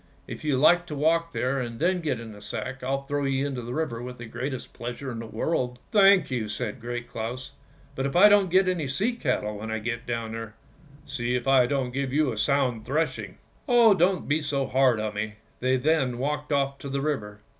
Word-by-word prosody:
If -, -, -8 dB
you 150 Hz, -4 st, +1 dB
like 175 Hz, +5 st, +5 dB
to 150 Hz, -, -5 dB
walk 165 Hz, +3 st, +2 dB
there 135 Hz, -3 st, -1 dB
and 120 Hz, -2 st, -5 dB
then 180 Hz, +3 st, +1 dB
get 145 Hz, -7 st, -1 dB
into 110 Hz, -3 st, -9 dB
the -, -, -13 dB
sack, 125 Hz, +5 st, -5 dB
I'll 135 Hz, +2 st, -1 dB
throw 145 Hz, +1 st, -2 dB
you 135 Hz, 0 st, 0 dB
into 135 Hz, -3 st, -3 dB
the 120 Hz, +2 st, -5 dB
river 125 Hz, -8 st, -2 dB
with 125 Hz, 0 st, -7 dB
the 120 Hz, -, -8 dB
greatest 125 Hz, +3 st, -5 dB
pleasure 125 Hz, +3 st, -5 dB
in 115 Hz, -, -5 dB
the 115 Hz, -, -6 dB
world." 125 Hz, +1 st, -1 dB
" -, -, -36 dB
Thank 195 Hz, -, +5 dB
you," 115 Hz, -4 st, -2 dB
said 115 Hz, +1 st, -4 dB
Great 120 Hz, 0 st, -5 dB
Claus; 120 Hz, +2 st, -5 dB, 0.2 s
" -, -, -28 dB
but 135 Hz, +1 st, -1 dB
if 140 Hz, -, -5 dB
I 190 Hz, +4 st, +9 dB
don't 205 Hz, -2 st, +5 dB
get 185 Hz, +2 st, +4 dB
any 175 Hz, -6 st, 0 dB
sea 195 Hz, -, 0 dB
cattle 125 Hz, -, -1 dB
when 110 Hz, +1 st, -6 dB
I 110 Hz, -, -1 dB
get 115 Hz, +2 st, -4 dB
down 115 Hz, -2 st, -3 dB
there, 115 Hz, -1 st, -6 dB, 0.5 s
see 125 Hz, -3 st, -2 dB
if 125 Hz, -, -2 dB
I 130 Hz, -2 st, +5 dB
don't 135 Hz, -2 st, -1 dB
give 135 Hz, 0 st, -2 dB
you 145 Hz, -1 st, +2 dB
a 110 Hz, -, -5 dB
sound 130 Hz, -5 st, +1 dB
thrashing." 130 Hz, -, -2 dB, 0.2 s
" -, -, -34 dB
Oh! 235 Hz, -3 st, +7 dB
don't 185 Hz, 0 st, +1 dB
be 155 Hz, +2 st, +1 dB
so 140 Hz, -2 st, -1 dB
hard 130 Hz, -4 st, +3 dB
on 110 Hz, -1 st, -2 dB
me." 105 Hz, +1 st, -3 dB, 0.2 s
They 130 Hz, +1 st, +2 dB
then 135 Hz, -3 st, +1 dB
walked 150 Hz, +3 st, -2 dB
off 140 Hz, -1 st, 0 dB
to 140 Hz, -, -7 dB
the 140 Hz, 0 st, -2 dB
river. 105 Hz, -9 st, -3 dB
130 Hz, 235 wpm, -26 LUFS, 120-150 Hz, 0.5 s, I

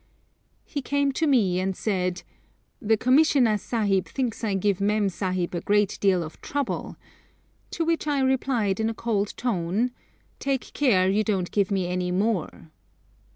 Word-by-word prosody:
He 285 Hz, -, -4 dB
came 285 Hz, +1 st, 0 dB
to 315 Hz, +4 st, 0 dB
me 205 Hz, -10 st, +3 dB
and 190 Hz, 0 st, -1 dB
said, 180 Hz, -4 st, -1 dB, 0.6 s
'The 220 Hz, +1 st, +2 dB
Commissioner 255 Hz, -3 st, +4 dB
Sahib 200 Hz, -4 st, 0 dB
thinks 250 Hz, -4 st, -3 dB
I 205 Hz, -3 st, 0 dB
give 195 Hz, 0 st, 0 dB
Mem 205 Hz, 0 st, +2 dB
Sahib 185 Hz, -2 st, -2 dB
a 175 Hz, -, -2 dB
great 205 Hz, 0 st, +1 dB
deal 185 Hz, -3 st, +3 dB
of 155 Hz, -, -10 dB
trouble;' 285 Hz, -3 st, -3 dB, 0.7 s
to 330 Hz, -, -2 dB
which 330 Hz, -1 st, 0 dB
I 290 Hz, -2 st, +1 dB
replied 255 Hz, -6 st, +1 dB
in 220 Hz, 0 st, +1 dB
a 225 Hz, -, -4 dB
cold 210 Hz, -3 st, -2 dB
tone, 215 Hz, +1 st, 0 dB, 0.5 s
'Take 275 Hz, -2 st, -2 dB
care 205 Hz, -10 st, +3 dB
you 200 Hz, +3 st, +2 dB
don't 195 Hz, -5 st, -1 dB
give 200 Hz, -3 st, +1 dB
me 195 Hz, -3 st, 0 dB
any 180 Hz, 0 st, -2 dB
more.' 185 Hz, -4 st, -2 dB
210 Hz, 155 wpm, -25 LUFS, 185-250 Hz, 0.7 s, Commissioner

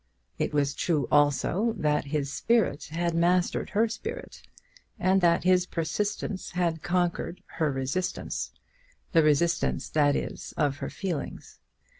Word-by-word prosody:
It -, -, 0 dB
was 145 Hz, -1 st, +1 dB
true 150 Hz, -6 st, 0 dB
also 145 Hz, -, +2 dB
that 150 Hz, -2 st, +1 dB
his 140 Hz, -1 st, -2 dB
spirit 220 Hz, -10 st, +1 dB
had 170 Hz, +2 st, -2 dB
mastered 175 Hz, +2 st, +2 dB
her 220 Hz, +3 st, +2 dB
spirit, 220 Hz, 0 st, -7 dB, 0.6 s
and 190 Hz, 0 st, +3 dB
that 170 Hz, -1 st, +3 dB
his 180 Hz, 0 st, +3 dB
persistence 185 Hz, +4 st, -2 dB
had 170 Hz, -3 st, 0 dB
conquered 175 Hz, -1 st, -1 dB, 0.2 s
her 155 Hz, -3 st, +2 dB
resistance, 135 Hz, +7 st, -2 dB, 0.6 s
the 165 Hz, -, +5 dB
resistance, 165 Hz, +3 st, +1 dB
that 145 Hz, -2 st, +3 dB
is, -, -, -5 dB
of 145 Hz, -2 st, +1 dB
her -, -, -4 dB
feelings. 175 Hz, -8 st, -5 dB
170 Hz, 130 wpm, -27 LUFS, 145-185 Hz, 0.6 s, the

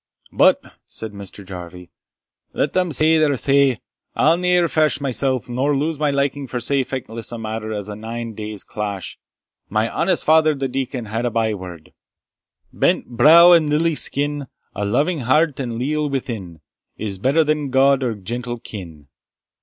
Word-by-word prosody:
"But," -, -, +2 dB
said 110 Hz, -1 st, -6 dB
Mr. 100 Hz, 0 st, -10 dB
Jarvie, 90 Hz, -1 st, -9 dB, 0.6 s
"let -, -, -1 dB
them 180 Hz, -2 st, +1 dB
say 155 Hz, +3 st, +4 dB
their 145 Hz, -3 st, +2 dB
say. 140 Hz, -2 st, +3 dB, 0.3 s
I'll 160 Hz, +2 st, +4 dB
ne'er 180 Hz, 0 st, +2 dB
fash 155 Hz, -3 st, +1 dB
mysell, 135 Hz, -1 st, 0 dB
nor 135 Hz, +4 st, 0 dB
lose 150 Hz, +1 st, -2 dB
my 150 Hz, -1 st, +1 dB
liking 140 Hz, 0 st, -1 dB
for 125 Hz, -, -4 dB
sae 135 Hz, +3 st, +1 dB
feckless 115 Hz, -4 st, -5 dB
a 120 Hz, -, -5 dB
matter 110 Hz, 0 st, -5 dB
as 105 Hz, -2 st, -4 dB
a 105 Hz, -, -6 dB
nine 115 Hz, +1 st, -6 dB
days' 105 Hz, -1 st, -6 dB
clash. 100 Hz, -4 st, -5 dB, 0.5 s
My 110 Hz, +3 st, +1 dB
honest 185 Hz, +8 st, 0 dB
father 155 Hz, -1 st, +4 dB
the 135 Hz, -1 st, -2 dB
deacon 130 Hz, -2 st, -4 dB
had 110 Hz, +3 st, -2 dB
a -, -, +1 dB
byword, 100 Hz, -8 st, -4 dB, 0.8 s
Brent -, -, +1 dB
brow 160 Hz, +9 st, +7 dB
and 165 Hz, -3 st, +5 dB
lily 160 Hz, +2 st, +2 dB
skin, 145 Hz, -1 st, -1 dB, 0.3 s
A 105 Hz, -, -3 dB
loving 150 Hz, -, 0 dB
heart, 140 Hz, +4 st, +2 dB
and 125 Hz, -3 st, -3 dB
a -, -, -5 dB
leal 150 Hz, +4 st, -1 dB
within, 110 Hz, -, -5 dB, 0.4 s
Is 100 Hz, -3 st, -4 dB
better 140 Hz, +9 st, +3 dB
than 150 Hz, -2 st, -1 dB
gowd 135 Hz, +1 st, +3 dB
or 120 Hz, -4 st, -1 dB
gentle 120 Hz, +4 st, -5 dB
kin. 85 Hz, -10 st, -10 dB
130 Hz, 165 wpm, -20 LUFS, 110-150 Hz, 0.8 s, brow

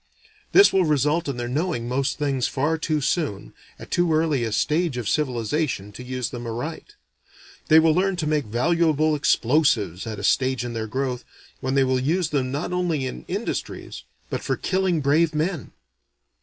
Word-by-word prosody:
This 395 Hz, +1 st, +7 dB
will 190 Hz, -, +4 dB
result 150 Hz, +1 st, +1 dB
in 140 Hz, -3 st, -3 dB
their 120 Hz, 0 st, -3 dB
knowing 135 Hz, -2 st, -2 dB
most 135 Hz, +3 st, -1 dB
things 140 Hz, -4 st, 0 dB
far 145 Hz, +4 st, 0 dB
too 155 Hz, -1 st, -1 dB
soon, 140 Hz, -, -2 dB, 0.2 s
at -, -, -12 dB
too 175 Hz, -1 st, +2 dB
early 155 Hz, -5 st, +1 dB
a 115 Hz, -, -2 dB
stage 150 Hz, +5 st, 0 dB
of 120 Hz, -4 st, -3 dB
civilization 125 Hz, -4 st, -1 dB
to 115 Hz, -, -10 dB
use 125 Hz, -1 st, -3 dB
them 120 Hz, -1 st, -6 dB
aright. 155 Hz, -, -6 dB, 0.7 s
They 160 Hz, -, +6 dB
will 160 Hz, 0 st, +4 dB
learn 190 Hz, +3 st, +1 dB
to 170 Hz, -3 st, -3 dB
make 150 Hz, -2 st, 0 dB
valuable 155 Hz, +6 st, +2 dB
explosives 120 Hz, -, +1 dB
at 110 Hz, -1 st, -5 dB
a -, -, -7 dB
stage 130 Hz, -2 st, +1 dB
in 120 Hz, -, -5 dB
their 110 Hz, -1 st, -3 dB
growth, 130 Hz, +1 st, -3 dB, 0.4 s
when 130 Hz, +1 st, -2 dB
they 135 Hz, -, +4 dB
will 130 Hz, -1 st, +1 dB
use 160 Hz, +5 st, 0 dB
them 130 Hz, -4 st, -1 dB
not 145 Hz, +6 st, -3 dB
only 170 Hz, -6 st, 0 dB
in 130 Hz, -, -6 dB
industries, 200 Hz, +5 st, -4 dB, 0.3 s
but -, -, -2 dB
for -, -, -1 dB
killing 185 Hz, -4 st, 0 dB
brave 155 Hz, +3 st, +2 dB
men. 155 Hz, -1 st, -2 dB
145 Hz, 180 wpm, -23 LUFS, 125-160 Hz, 0.7 s, This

